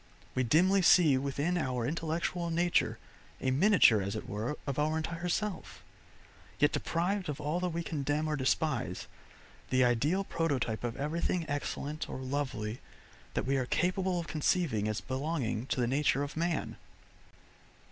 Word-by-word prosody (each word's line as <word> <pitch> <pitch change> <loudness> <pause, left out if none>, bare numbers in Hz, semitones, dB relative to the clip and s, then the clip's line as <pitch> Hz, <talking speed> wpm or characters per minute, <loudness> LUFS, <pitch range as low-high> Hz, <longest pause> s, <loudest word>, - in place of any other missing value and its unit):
We 130 - +1
dimly 180 +10 +4
see 170 -5 +6
within 140 +6 -1
our 125 -5 -1
intellectual 170 +3 -2
nature 175 +1 +1 0.4
a 130 - 0
miniature 145 - +5
as 100 +1 -3
it - - -5
were 110 +8 -3
of 140 0 -2
our 155 +1 +1
entire 165 +2 -3
self, 205 -1 -3 0.7
yet 145 - +4
deprived 185 +2 -1
of 145 - -4
all 150 +4 -1
that 180 0 -1
we 170 0 -3
condemn 150 0 -1
or 155 - 0
despise, 130 - 0 0.6
the 130 0 +4
ideal 145 +11 +2
prototype 140 - -1
of 120 0 -3
everything 165 +4 -1
excellent 145 +1 -3
or - - -5
lovely 130 -5 -3 0.6
that - - 0
we 135 +1 +1
are 130 -2 -1
capable 185 +2 +1
of 170 - -4
conceiving 155 - 0
as 110 -2 -2
belonging 130 - -2
to - - -1
the 120 - +3
nature 140 +2 +2
of 145 - -6
man. 165 0 -1
150 Hz, 155 wpm, -31 LUFS, 130-170 Hz, 0.7 s, see